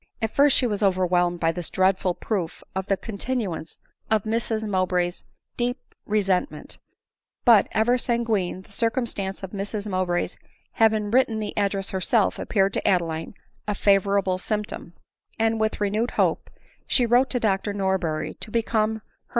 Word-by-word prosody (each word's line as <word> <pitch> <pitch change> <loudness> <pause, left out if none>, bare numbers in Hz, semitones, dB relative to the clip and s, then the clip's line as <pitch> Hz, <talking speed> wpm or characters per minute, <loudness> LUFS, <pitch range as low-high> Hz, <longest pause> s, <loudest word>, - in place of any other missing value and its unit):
At 220 -1 -1
first 285 0 +5
she - - +2
was 210 -3 -1
overwhelmed 180 -2 +2
by 165 -1 +2
this 175 -1 -5
dreadful 185 -1 +1
proof 180 -3 -3
of 190 0 -2
the 195 - +1
continuance 205 -6 -4 0.3
of 220 -2 +2
Mrs 220 0 -1
Mowbray's 180 -2 0 0.3
deep 245 +1 0 0.3
resentment; 205 +3 -1 0.7
but, 230 -5 +7
ever 240 +3 +2
sanguine, 225 -7 -1
the - - -21
circumstance 225 -4 -1
of 190 - -6
Mr£ 205 +1 -4
Mowbray's 185 -3 -1 0.3
having 215 -2 +2
written 240 -2 +3
the 215 -1 -4
address 200 -1 -1
herself 200 +3 +1
appeared 195 -2 +1
to - - -1
Adeline 165 -1 0 0.3
a 210 - 0
favorable 195 -2 +2
symptom; 210 -4 -4 0.4
and 225 0 +1
with 220 0 0
renewed 210 +4 0
hope - - +1 0.4
she 250 - +3
wrote 245 +3 +3
to 245 - 0
Dr 205 -2 0
Norberry 190 -6 -1
to - - -7
become 220 -1 +1
her. 220 - -9
205 Hz, 150 wpm, -24 LUFS, 185-225 Hz, 0.7 s, but